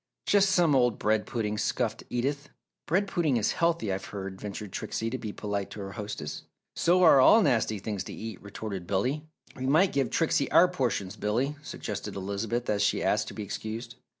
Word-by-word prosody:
"Just 200 Hz, -1 st, +4 dB
some 175 Hz, -5 st, +4 dB
old 125 Hz, -4 st, +3 dB
bread 110 Hz, 0 st, +1 dB
pudding!" 105 Hz, -3 st, -2 dB
scoffed -, -, -1 dB
Edith. 140 Hz, +4 st, -2 dB, 0.4 s
"Bread 195 Hz, +5 st, +2 dB
pudding 165 Hz, -9 st, +1 dB
is 110 Hz, -, +1 dB
healthy, 165 Hz, -, +1 dB
I've 95 Hz, +1 st, -4 dB
heard," 95 Hz, -1 st, -7 dB
ventured 105 Hz, -1 st, -6 dB
Trixie 115 Hz, +4 st, -3 dB
to 130 Hz, -, -2 dB
be 110 Hz, -, -5 dB
polite 100 Hz, -1 st, -3 dB
to -, -, -9 dB
her 100 Hz, 0 st, -6 dB
hostess. 105 Hz, +1 st, -5 dB, 0.3 s
"So 180 Hz, +2 st, +3 dB
are 150 Hz, -6 st, +8 dB
all 220 Hz, +11 st, +7 dB
nasty 115 Hz, -6 st, +2 dB
things 100 Hz, 0 st, -4 dB
to -, -, -7 dB
eat!" 110 Hz, 0 st, -7 dB
retorted 100 Hz, -3 st, -6 dB
Billy. 130 Hz, +11 st, -1 dB, 0.3 s
"We 130 Hz, 0 st, -3 dB
might 160 Hz, +7 st, +4 dB
give 135 Hz, -3 st, +1 dB
Trixie 160 Hz, -3 st, +1 dB
our 180 Hz, -, +6 dB
portions, 120 Hz, -, -1 dB
Billy," 120 Hz, +8 st, 0 dB
suggested -, -, -6 dB
Elizabeth, 100 Hz, +5 st, -2 dB
as 105 Hz, -1 st, +1 dB
she 100 Hz, -, +2 dB
asked -, -, +1 dB
to -, -, -8 dB
be 105 Hz, -, -4 dB
excused. 110 Hz, +4 st, -5 dB
115 Hz, 190 wpm, -28 LUFS, 105-145 Hz, 0.4 s, are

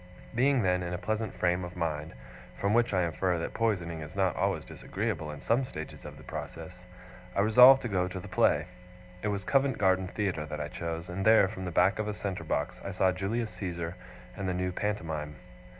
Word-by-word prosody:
Being 130 Hz, +1 st, +3 dB
then 90 Hz, -1 st, +2 dB
in 90 Hz, 0 st, -3 dB
a -, -, -3 dB
pleasant 110 Hz, +2 st, -2 dB
frame 90 Hz, 0 st, +1 dB
of 90 Hz, 0 st, -7 dB
mind 80 Hz, -4 st, -3 dB, 0.4 s
(from 100 Hz, +1 st, +1 dB
which 120 Hz, +1 st, +3 dB
I 90 Hz, -2 st, +2 dB
infer 85 Hz, +2 st, 0 dB
that 85 Hz, -, -4 dB
poisoning 90 Hz, -8 st, -1 dB
is 75 Hz, +2 st, -9 dB
not 95 Hz, -4 st, +1 dB
always -, -, 0 dB
disagreeable 75 Hz, -, -3 dB
in 75 Hz, -1 st, -7 dB
some 120 Hz, +4 st, +2 dB
stages 80 Hz, -11 st, -7 dB
of -, -, -9 dB
the -, -, -13 dB
process), -, -, -8 dB, 0.5 s
I 100 Hz, -, +3 dB
resolved 125 Hz, +5 st, +8 dB
to -, -, -1 dB
go 90 Hz, -4 st, 0 dB
to 95 Hz, 0 st, -5 dB
the -, -, -9 dB
play. -, -, +3 dB, 0.6 s
It -, -, -2 dB
was 100 Hz, -1 st, -1 dB
Covent 135 Hz, +3 st, +2 dB
Garden 95 Hz, -1 st, +2 dB
Theatre 90 Hz, -6 st, -2 dB
that 75 Hz, 0 st, -5 dB
I 75 Hz, 0 st, -3 dB
chose; 85 Hz, +2 st, -4 dB
and 90 Hz, +2 st, -4 dB
there, 110 Hz, -2 st, +6 dB
from 95 Hz, -1 st, -6 dB
the 90 Hz, -, -3 dB
back 95 Hz, +4 st, +3 dB
of 110 Hz, -, -1 dB
a 105 Hz, -, -2 dB
centre 95 Hz, -5 st, -4 dB
box, 80 Hz, -, -2 dB
I -, -, -4 dB
saw 95 Hz, 0 st, +3 dB
Julius 110 Hz, +5 st, -2 dB
Caesar 85 Hz, -2 st, -4 dB, 0.4 s
and 95 Hz, -1 st, -3 dB
the 90 Hz, -, -1 dB
new 90 Hz, 0 st, -1 dB
Pantomime. 80 Hz, -7 st, -3 dB
95 Hz, 215 wpm, -30 LUFS, 85-105 Hz, 0.6 s, resolved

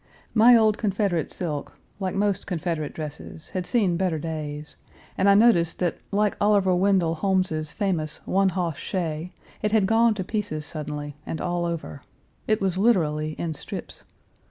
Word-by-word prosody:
My 235 Hz, +2 st, +7 dB
old 220 Hz, -2 st, +4 dB
Confederate 195 Hz, -6 st, 0 dB
silk, 150 Hz, -5 st, -4 dB, 0.2 s
like 190 Hz, -1 st, -2 dB
most 200 Hz, -1 st, 0 dB
Confederate 165 Hz, -4 st, -2 dB
dresses, 155 Hz, 0 st, -7 dB
had 185 Hz, -3 st, -4 dB
seen 200 Hz, -8 st, +2 dB
better 180 Hz, -3 st, 0 dB
days, 150 Hz, -1 st, -5 dB, 0.4 s
and 195 Hz, +1 st, +3 dB
I 200 Hz, -, +7 dB
noticed 200 Hz, -7 st, +4 dB
that, 175 Hz, -2 st, -1 dB
like 205 Hz, 0 st, +1 dB
Oliver 200 Hz, -3 st, +4 dB
Wendell 185 Hz, -3 st, +2 dB
Holmes's 165 Hz, -3 st, 0 dB
famous 175 Hz, -7 st, -2 dB
"one 195 Hz, 0 st, +2 dB
hoss 175 Hz, -6 st, -2 dB
stray," 170 Hz, -2 st, -3 dB, 0.3 s
it 210 Hz, -, 0 dB
had 215 Hz, -3 st, +4 dB
gone 225 Hz, +2 st, +4 dB
to 190 Hz, -, -3 dB
pieces 195 Hz, -7 st, -3 dB
suddenly, 150 Hz, -2 st, -5 dB
and 160 Hz, -, -5 dB
all 175 Hz, -1 st, -1 dB
over. 165 Hz, -4 st, -4 dB, 0.5 s
It 215 Hz, -1 st, +2 dB
was 190 Hz, -2 st, 0 dB
literally 155 Hz, -8 st, +2 dB
in 165 Hz, 0 st, -3 dB
strips. 145 Hz, -, -7 dB
180 Hz, 155 wpm, -25 LUFS, 155-200 Hz, 0.5 s, My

